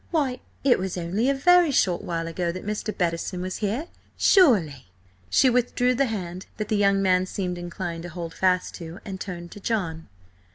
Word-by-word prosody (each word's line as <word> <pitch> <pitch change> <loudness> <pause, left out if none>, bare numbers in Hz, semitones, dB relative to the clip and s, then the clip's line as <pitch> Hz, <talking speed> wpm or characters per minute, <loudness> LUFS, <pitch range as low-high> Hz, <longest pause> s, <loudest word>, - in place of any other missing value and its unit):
"Why, 275 -7 0 0.2
it 260 -5 +4
was 185 -1 -3
only 190 +9 0
a 275 - +2
very 355 +4 +5
short 185 -10 +2
while 165 -1 -3
ago 170 +1 -2
that 185 +2 -8
Mr. 210 +1 -2
Bettison 175 0 -1
was 185 +1 -4
here, 220 +9 -2 0.3
surely!" 185 - +4 0.4
She 265 - +4
withdrew 250 0 +2
the 270 +2 +1
hand 185 -4 -5
that 215 - -4
the 215 - +2
young 200 -1 +3
man 185 -1 +3
seemed 180 -2 -3
inclined 170 -1 -5
to 175 - -7
hold 170 -1 -6
fast 185 -1 +1
to, 165 0 -8
and 190 -3 -6
turned 175 -3 -6
to - - -10
John. 180 -7 -2
185 Hz, 190 wpm, -25 LUFS, 175-230 Hz, 0.4 s, very